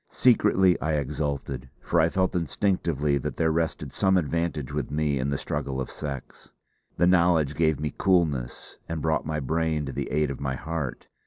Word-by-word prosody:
Secretly 95 -7 +4
I 80 - 0
exulted, 70 -2 -3
for - - 0
I 80 - +4
felt 95 +1 0
instinctively 80 -4 0
that - - -4
there 80 -1 +2
rested 80 0 -2
some 95 -1 +3
advantage 80 -4 -1
with - - -2
me 75 -2 0
in 65 +2 -1
the 70 - 0
struggle 70 -2 -3
of 65 - -4
sex. 70 -4 -7 0.5
The 85 - +4
knowledge 85 -5 +4
gave 80 -2 +1
me 75 -1 -3
coolness, 80 -10 0
and 80 -1 -2
brought 80 -1 0
my 75 -1 -1
brain 80 +1 0
to 70 - -4
the - - -4
aid 75 -1 +1
of 70 - -7
my 65 -1 -1
heart. 80 -2 -4
75 Hz, 180 wpm, -26 LUFS, 70-85 Hz, 0.5 s, Secretly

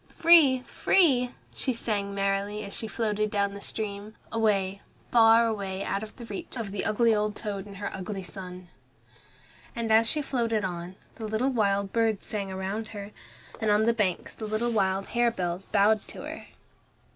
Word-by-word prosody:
"Free, 315 -6 +7
free!" 260 -10 +3 0.2
she 260 - -1
sang 205 -4 -2
merrily 200 +1 -1
as 200 - -2
she 225 - -3
floated 215 -1 -1
down 200 -1 0
the 200 - -8
stream, 210 0 -5 0.2
away, 200 -3 +1 0.3
far 230 0 +6
away 200 -3 -2
out 200 - -2
of 220 +3 -10
reach 210 +4 -6
of 220 -4 -4
the 200 - -3
ugly 225 +1 +3
old 210 0 0
toad 205 -2 -5
and 200 -1 -10
her 200 +1 -4
ugly 190 +1 -5
son. 180 -1 -8 1.1
And 230 -2 -2
as 225 +1 +5
she 300 -1 0
floated 230 -6 0
on, 175 0 -5 0.2
the 220 - -5
little 220 +5 0
wild 200 -4 +1
birds 225 -3 +1
sang 200 -2 -3
round 195 +4 -3
her, 200 +1 -7 0.5
and 220 -1 0
on 210 +1 +4
the 235 - +4
banks 200 -6 -1
the 220 - -6
little 220 +3 0
wild 195 -3 0
harebells 195 -7 0
bowed 210 +1 +3
to - - -9
her. - - -8
210 Hz, 170 wpm, -27 LUFS, 195-225 Hz, 1.1 s, Free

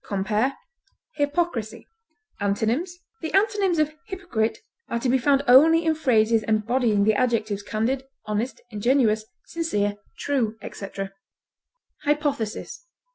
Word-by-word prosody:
Compare 210 +6 0 0.6
HYPOCRISY. 290 -6 -1 0.5
Antonyms: 225 - -1 0.2
The 320 - -4
antonyms 395 -3 +2
of 305 0 +1
hypocrite 350 - -2 0.3
are 235 - -1
to 235 - -1
be 260 +1 +3
found 275 +2 +3
only 325 +7 +7
in 320 - +3
phrases 230 -7 +3
embodying 215 0 +1
the 215 +1 +4
adjectives 215 -3 0
candid, 230 +6 -1 0.2
honest, 215 +4 -2
ingenuous, 220 0 +2 0.2
sincere, 205 -12 -1 0.2
true, 235 -6 -1
etc. 195 0 -6 0.9
HYPOTHESIS. 295 - -2
245 Hz, 110 wpm, -24 LUFS, 215-305 Hz, 0.9 s, only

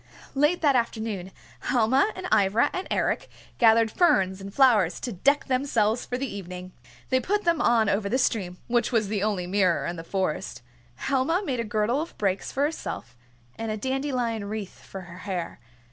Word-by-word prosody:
Late 295 +5 +2
that 285 -3 +4
afternoon 220 -6 -2 0.3
Helma 260 - +2
and 370 - -6
Ivra 215 +6 +3
and 370 - -3
Eric - - 0 0.3
gathered 225 -1 +5
ferns 190 - +2
and 195 +1 -7
flowers 215 -9 +4
to 245 - -3
deck 280 +10 +2
themselves 250 -4 +1
for 245 - -2
the 270 - -2
evening. 185 -5 -7 0.4
They 260 - +3
put 410 +10 0
them 340 -2 +2
on 230 -3 +3
over 200 0 0
the 255 - +2
stream, 195 -9 0
which 240 +1 +1
was 220 -4 +1
the 205 -2 -1
only 205 -4 0
mirror 185 -1 +2
in 175 - -3
the 165 - -6
Forest. 185 -8 -3 0.3
Helma 280 - 0
made 255 -6 -2
a - - 0
girdle 215 +5 0
of 330 - -7
brakes 195 -2 -1
for 275 - 0
herself, 290 - -4 0.4
and 225 0 -3
a 215 - -2
dandelion 250 -3 -1
wreath 205 -1 -6
for 195 - -8
her 175 0 -11
hair. 185 -7 -4
220 Hz, 180 wpm, -26 LUFS, 195-265 Hz, 0.4 s, gathered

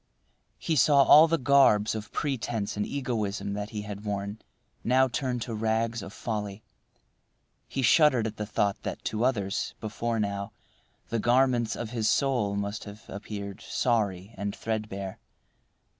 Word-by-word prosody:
He 160 - -1
saw 140 +1 +6
all 155 +4 +8
the 165 +1 +2
garbs 125 -6 +4
of 110 -1 -6
pretence 120 -7 -2
and 105 0 -1
egoism 105 -7 -2
that 105 +1 -4
he 105 -2 -5
had 105 0 -7
worn 100 0 -3 0.4
now 130 +2 +4
turn 130 0 -2
to 115 - -4
rags 110 +1 0
of 95 0 -8
folly. 105 -1 -4 1.0
He 135 - -3
shuddered 130 -3 +5
at 110 -1 -4
the 105 - -4
thought 100 -2 0
that - - -6
to 110 +1 -1
others, 105 -6 -1
before 115 +1 -2
now, 100 -1 -2 0.6
the 115 - -1
garments 120 0 +2
of 115 -2 -5
his 110 -3 0
soul 115 -4 +1
must 100 +1 -3
have 105 +1 -11
appeared 100 -1 -7
sorry 105 -4 -1
and 100 +1 -3
threadbare. 105 -4 -4
110 Hz, 150 wpm, -28 LUFS, 100-120 Hz, 1.0 s, all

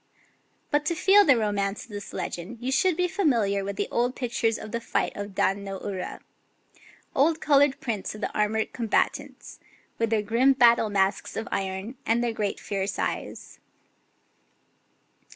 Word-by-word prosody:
But 295 0 +2
to 340 - +1
feel 400 +5 +6
the 280 -9 +5
romance 205 -2 -1
of 230 - -15
this 205 -1 -7
legend 180 +8 -5
you 250 +2 -3
should 360 +4 +2
be 360 0 +2
familiar 235 - +1
with 200 0 -5
old 245 +1 0
pictures 230 -2 0
of 215 - -9
the 235 - -2
fight - - -1
of 205 -1 -6
Dan 195 +2 +1
no 195 -1 -5
Ura, 190 -3 -5 0.5
— - - -27
old 315 +4 +3
coloured 285 -1 +3
prints 215 -4 -3
of 215 - -10
the - - -3
armoured 215 +1 0
combatants, 230 -3 -2 0.4
with 230 -1 +1
their 220 -2 +1
grim 240 +6 +3
battle 235 -4 +5
masks 195 -1 0
of 220 - -3
iron 195 +5 -3
and 230 +2 +1
their 235 -1 0
great 210 -2 -2
fierce 195 0 -3
eyes. - - -4
225 Hz, 165 wpm, -26 LUFS, 200-260 Hz, 0.5 s, feel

